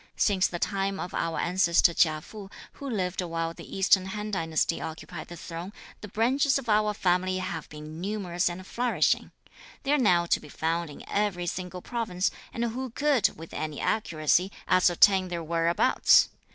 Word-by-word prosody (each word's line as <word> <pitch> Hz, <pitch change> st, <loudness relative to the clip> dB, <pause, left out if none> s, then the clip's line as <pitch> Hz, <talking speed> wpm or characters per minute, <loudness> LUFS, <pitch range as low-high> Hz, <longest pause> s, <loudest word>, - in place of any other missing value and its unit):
Since 195 Hz, -3 st, +2 dB
the 175 Hz, -, -5 dB
time 195 Hz, +1 st, -1 dB
of 180 Hz, -, -5 dB
our 165 Hz, -1 st, -1 dB
ancestor 175 Hz, -1 st, +3 dB
Chia 155 Hz, -2 st, +2 dB
Fu, 205 Hz, +3 st, -10 dB, 0.2 s
who 280 Hz, -, -7 dB
lived 190 Hz, -5 st, -1 dB
while 165 Hz, -1 st, -3 dB
the -, -, -9 dB
Eastern 190 Hz, -1 st, +4 dB
Han 210 Hz, +2 st, -5 dB
dynasty 165 Hz, -3 st, 0 dB
occupied 160 Hz, +1 st, -7 dB
the 175 Hz, -, -9 dB
Throne, 170 Hz, +4 st, -7 dB, 0.3 s
the 210 Hz, -, -7 dB
branches 255 Hz, +7 st, +2 dB
of 270 Hz, -3 st, -6 dB
our 210 Hz, -1 st, +2 dB
family 185 Hz, -1 st, +1 dB
have 185 Hz, -4 st, -5 dB
been 155 Hz, +2 st, -9 dB
numerous 185 Hz, -3 st, -1 dB
and 180 Hz, +2 st, -7 dB
flourishing; 245 Hz, +4 st, +1 dB, 0.5 s
they 280 Hz, -, 0 dB
are 295 Hz, -, +3 dB
now 180 Hz, -8 st, +4 dB
to -, -, +2 dB
be 150 Hz, -, -13 dB
found 165 Hz, +2 st, -2 dB
in 145 Hz, -, -11 dB
every 200 Hz, -4 st, -1 dB
single 180 Hz, +1 st, -5 dB
province, 215 Hz, -7 st, -1 dB, 0.2 s
and 235 Hz, -, -3 dB
who 250 Hz, +3 st, -3 dB
could, 280 Hz, -1 st, +1 dB
with 165 Hz, +1 st, -10 dB
any 155 Hz, -2 st, -4 dB
accuracy, 175 Hz, -2 st, +1 dB, 0.2 s
ascertain 185 Hz, +1 st, +5 dB
their 170 Hz, -2 st, -4 dB
whereabouts? 165 Hz, +1 st, +4 dB
185 Hz, 170 wpm, -27 LUFS, 170-210 Hz, 0.5 s, ascertain